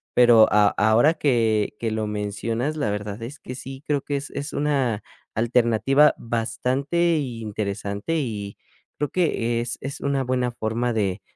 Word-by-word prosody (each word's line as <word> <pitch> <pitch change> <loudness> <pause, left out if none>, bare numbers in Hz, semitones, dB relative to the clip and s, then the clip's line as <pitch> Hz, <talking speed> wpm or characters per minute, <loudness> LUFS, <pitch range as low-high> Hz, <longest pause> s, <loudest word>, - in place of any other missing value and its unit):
pero 120 -3 +7
a 105 -1 +5
ahora 110 +11 +4
que 115 -9 +1
que 115 -1 -2
lo 110 -1 -2
mencionas, 115 +7 -2
la 125 -8 0
verdad 105 +1 -4
es 135 +6 -8
que 125 - -8
sí, 135 +1 -9
creo 145 -2 +1
que 145 - -3
es 140 +1 -7
es 145 +1 -5
una 135 -7 0 0.3
alternativa 120 +5 +3
bastante 130 +9 0
interesante 110 -1 -3
y 105 -8 -4 0.4
creo 150 - -1
que 120 -10 0
es 120 - -4
es 135 +1 -5
una 140 -1 0
buena 125 -1 0
forma 115 +1 -2
de 100 -3 -1
120 Hz, 155 wpm, -24 LUFS, 110-135 Hz, 0.4 s, pero